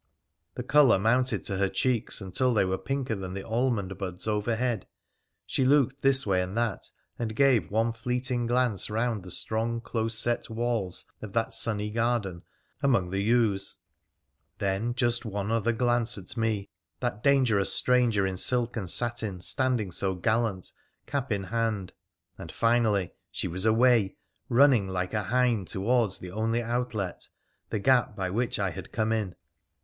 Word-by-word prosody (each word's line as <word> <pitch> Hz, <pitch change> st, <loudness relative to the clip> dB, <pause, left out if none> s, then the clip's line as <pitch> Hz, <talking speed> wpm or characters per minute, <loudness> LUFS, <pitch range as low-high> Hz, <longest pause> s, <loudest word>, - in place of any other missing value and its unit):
The -, -, -4 dB
colour 145 Hz, -7 st, +5 dB
mounted 125 Hz, +6 st, +1 dB
to 100 Hz, -4 st, -2 dB
her 100 Hz, 0 st, +1 dB
cheeks 120 Hz, -2 st, -1 dB
until 115 Hz, +6 st, 0 dB
they 105 Hz, -, +3 dB
were 95 Hz, 0 st, -1 dB
pinker 135 Hz, -4 st, -2 dB
than 95 Hz, -2 st, -5 dB
the 95 Hz, -, -6 dB
almond 115 Hz, -5 st, 0 dB
buds 90 Hz, 0 st, -5 dB
overhead. 110 Hz, +1 st, -1 dB, 0.6 s
She -, -, 0 dB
looked 135 Hz, 0 st, +3 dB
this 135 Hz, 0 st, +3 dB
way 95 Hz, -3 st, +2 dB
and 90 Hz, +4 st, -4 dB
that, 115 Hz, -4 st, -1 dB, 0.3 s
and 110 Hz, -2 st, -3 dB
gave 125 Hz, -, +3 dB
one 115 Hz, +2 st, +1 dB
fleeting 125 Hz, +1 st, -2 dB
glance 120 Hz, -5 st, +1 dB
round 115 Hz, 0 st, -1 dB
the 90 Hz, -, -10 dB
strong, 115 Hz, +5 st, -1 dB
close 115 Hz, -1 st, -3 dB
set 120 Hz, +1 st, -1 dB
walls 115 Hz, -5 st, -2 dB, 0.2 s
of 105 Hz, -3 st, -8 dB
that 115 Hz, -1 st, 0 dB
sunny 105 Hz, -2 st, -1 dB
garden 115 Hz, -6 st, -1 dB, 0.4 s
among 120 Hz, -11 st, +2 dB
the 95 Hz, -, -1 dB
yews, 105 Hz, -3 st, +1 dB, 0.8 s
then 100 Hz, +5 st, -1 dB
just 120 Hz, -2 st, +1 dB
one 105 Hz, -2 st, -3 dB
other 115 Hz, +1 st, +2 dB
glance 120 Hz, 0 st, +1 dB
at 95 Hz, +2 st, -8 dB
me, 110 Hz, -6 st, -1 dB, 0.3 s
that 120 Hz, -4 st, -2 dB
dangerous 125 Hz, -8 st, +3 dB
stranger 120 Hz, -6 st, +3 dB
in 95 Hz, -1 st, -2 dB
silk 120 Hz, +4 st, +1 dB
and 100 Hz, -6 st, -3 dB
satin, 110 Hz, -3 st, -2 dB
standing 120 Hz, 0 st, +2 dB
so 95 Hz, +2 st, 0 dB
gallant, 110 Hz, 0 st, 0 dB, 0.3 s
cap 140 Hz, -3 st, -3 dB
in 100 Hz, -2 st, 0 dB
hand, 110 Hz, -2 st, -2 dB, 0.5 s
and -, -, -8 dB
finally 115 Hz, -5 st, +2 dB, 0.2 s
she -, -, -3 dB
was 95 Hz, +5 st, -2 dB
away, 115 Hz, -2 st, +4 dB, 0.3 s
running 125 Hz, -5 st, +5 dB
like 90 Hz, 0 st, -3 dB
a 105 Hz, -, +1 dB
hind 120 Hz, -4 st, +1 dB
towards 110 Hz, 0 st, +1 dB
the 90 Hz, -, -9 dB
only 115 Hz, +3 st, 0 dB
outlet, 115 Hz, -5 st, -3 dB, 0.4 s
the -, -, -1 dB
gap 120 Hz, 0 st, +3 dB
by 95 Hz, -3 st, -2 dB
which 115 Hz, +4 st, 0 dB
I 100 Hz, -3 st, 0 dB
had -, -, -9 dB
come 110 Hz, 0 st, 0 dB
in. 105 Hz, -5 st, -1 dB
115 Hz, 160 wpm, -28 LUFS, 100-120 Hz, 0.8 s, colour